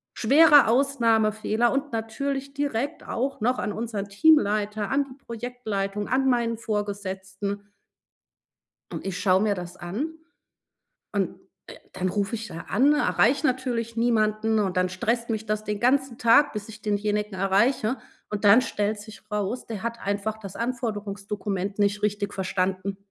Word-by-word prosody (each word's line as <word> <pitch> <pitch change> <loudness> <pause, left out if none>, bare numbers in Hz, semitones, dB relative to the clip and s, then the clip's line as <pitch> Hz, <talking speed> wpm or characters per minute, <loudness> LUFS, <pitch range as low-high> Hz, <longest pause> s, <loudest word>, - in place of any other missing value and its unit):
„schwerer 290 +2 +6
Ausnahmefehler“ 230 -3 +2
und 275 0 -1
natürlich 275 +5 -3
direkt 285 +1 -2
auch 265 -1 -2
noch 250 +3 +1
an 210 - -2
unseren 215 -3 -4
Teamleiter, 210 -5 +3
an 280 +1 +3
die 260 0 -14
Projektleitung, 215 -4 -3
an 265 +2 +1
meinen 235 -2 +1
Vorgesetzten. 200 -1 -4 1.2
Und - - -6
ich 195 -1 -3
schaue 190 -1 +3
mir 210 -2 +2
das 180 0 -7
an 235 - -4 1.0
und, - - -1 0.3
äh, - - -10 0.2
dann 185 0 -1
ruf 200 +2 -1
ich 225 0 -4
da 165 -1 -8
an, 270 +8 +4
erreiche 295 0 +3
natürlich 245 -3 -1
niemanden 220 -1 +2
und 190 -3 0
dann 185 0 +2
stresst 230 +5 -1
mich 220 -1 -2
das 215 0 -2
den 210 -1 -3
ganzen 260 -1 +2
Tag, 235 +5 +5
bis 210 0 -6
ich 215 0 -11
denjenigen 210 0 -1
erreiche. 215 +5 +2 0.3
Und 210 0 -4
dann 215 +5 +7
stellt 210 -3 -1
sich 215 0 -11
raus, 210 +4 -2
der 220 -3 -6
hat 235 0 -3
einfach 205 +2 -2
das 195 -3 -9
Anforderungsdokument 205 -4 -3
nicht 205 0 +1
richtig 205 -1 -1
verstanden. 190 0 -1
215 Hz, 150 wpm, -25 LUFS, 200-240 Hz, 1.2 s, dann